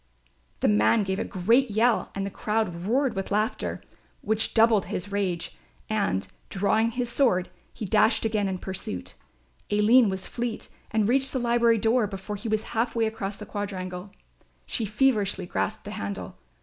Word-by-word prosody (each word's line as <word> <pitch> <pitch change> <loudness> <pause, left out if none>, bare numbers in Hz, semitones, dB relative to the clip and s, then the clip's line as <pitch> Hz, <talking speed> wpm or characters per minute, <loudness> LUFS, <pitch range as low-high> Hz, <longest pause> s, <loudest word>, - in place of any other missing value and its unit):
The - - +3
man 105 - +4
gave 190 0 -2
a - - 0
great 230 +8 +2
yell 225 +3 +2
and 195 0 -2
the 200 - -4
crowd 200 -4 -2
roared 255 0 +1
with 195 0 -3
laughter, 215 +3 -1 0.4
which 220 +1 -1
doubled 225 -2 +5
his 190 +3 -4
rage 190 -4 -2 0.4
and, 195 - 0 0.2
drawing 215 +3 +2
his 245 +1 -2
sword, 235 -7 +1 0.2
he 215 - -6
dashed 215 +3 +3
again 215 -2 +1
in 190 -1 -2
pursuit. 180 - -5 0.6
Aline 215 +3 +5
was 190 0 -4
fleet 235 -2 -4 0.2
and 215 -2 +1
reached 265 +3 +2
the 260 - 0
library 235 -1 +3
door 225 +1 +2
before 195 +1 -6
he 220 +3 -5
was 215 0 0
half 230 +1 0
way 230 -1 +2
across 205 -2 -3
the 210 - -8
quadrangle. 185 -2 -5 0.6
She 225 - -2
feverishly 210 -4 +1
grasped 215 +4 -2
the 205 - -7
handle. 100 - -5
210 Hz, 165 wpm, -26 LUFS, 195-230 Hz, 0.6 s, doubled